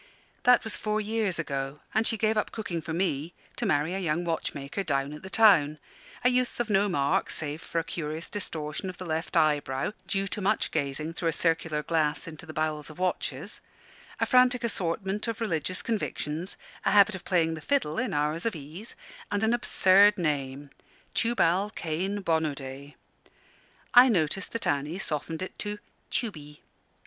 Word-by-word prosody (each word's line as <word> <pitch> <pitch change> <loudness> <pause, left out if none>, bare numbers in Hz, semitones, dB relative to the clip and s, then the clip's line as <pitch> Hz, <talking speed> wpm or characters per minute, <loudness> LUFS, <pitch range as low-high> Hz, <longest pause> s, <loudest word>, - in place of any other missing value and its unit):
That 250 0 +6
was 220 - 0
four 215 0 -1
years 215 -3 -1
ago; 140 -2 -3
and 220 +1 +2
she 225 - 0
gave 215 +1 +2
up 215 - 0
cooking 180 -7 -4
for 160 - -6
me 165 -2 -1 0.2
to 240 - -2
marry 155 0 +1
a 190 - -2
young 170 -2 0
watchmaker 155 0 -3
down 140 -5 -1
at 150 - -9
the 190 - -8
town 180 -9 +5 0.5
a - - +7
youth 250 -1 0
of 235 -2 -1
no 200 +1 +3
mark 140 -5 +1
save 150 0 -3
for - - -5
a 165 - +2
curious 160 -1 -4
distortion 160 -3 -3
of 180 - -8
the 185 - -7
left 160 +1 -2
eyebrow 145 0 +1
(due 195 -1 0
to 210 - -2
much 205 +3 +1
gazing 150 +1 -2
through 170 - -2
a - - +3
circular 160 -1 +1
glass 155 -1 0
into 160 0 -9
the - - -6
bowels 155 -2 -2
of 155 - -11
watches), 185 0 -2 0.6
a - - +3
frantic 250 -1 +4
assortment 195 0 -1
of 230 -1 -3
religious 185 -3 -1
convictions, 180 -6 -3 0.3
a - - +2
habit 200 +1 +6
of 190 - -7
playing 165 -3 +2
the 160 - -6
fiddle 160 - 0
in - - -1
hours 150 +3 0
of 220 - -1
ease, 160 +9 -8 0.4
and 205 +1 0
an 220 +2 +3
absurd 205 -3 +5
name 145 -4 -2 0.4
Tubal 205 -4 +2
Cain 190 +5 -2
Bonaday. 145 -4 -2 1.0
I 250 +1 +9
noticed 180 -2 0
that 230 - -2
Annie 145 +4 0
softened 160 -1 -3
it 185 - -8
to 210 0 -3 0.3
"Tubey." 150 -10 -4
170 Hz, 175 wpm, -28 LUFS, 150-205 Hz, 1.0 s, I